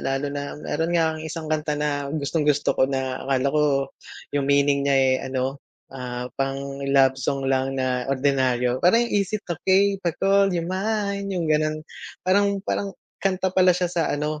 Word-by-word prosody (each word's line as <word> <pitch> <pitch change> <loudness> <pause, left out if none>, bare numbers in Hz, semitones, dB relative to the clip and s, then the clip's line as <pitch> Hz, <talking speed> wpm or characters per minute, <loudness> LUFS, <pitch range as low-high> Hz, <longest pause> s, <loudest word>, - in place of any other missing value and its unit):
lalo 135 +1 -2
na 145 0 -5
meron 155 +2 -2
nga 160 -1 +2
akong 155 0 -7
isang 155 -1 -4
kanta 150 -1 -1
na 145 -1 -1
gustong-gusto 150 0 +1
ko 130 - +2
na 130 -1 -2
akala 135 0 +1
ko 150 0 +3 0.7
yung 140 -1 0
meaning 140 0 +3
niya, 140 - +4
eh, 130 -1 +4
ano, 130 +1 -2 0.3
ah, 125 -1 -6
pang-love 135 -1 +1
song 135 +1 -1
lang 135 0 0
na 130 -1 -1
ordinaryo 130 -2 +1
parang 230 +7 +4
"Is 200 -4 0
it 210 - -12
okey 190 +3 +2
to 175 -3 0
call 195 0 +3
you 175 -3 -1
mine?" 200 +2 -2
Yung 180 -4 -2
gano'n, 155 0 0 0.4
parang 200 +2 +3
parang 200 - -1 0.3
kanta 190 -1 0
pala 185 -1 +4
siya 180 - 0
sa 165 -3 0
ano, 150 +1 -2
145 Hz, 170 wpm, -24 LUFS, 135-180 Hz, 0.7 s, niya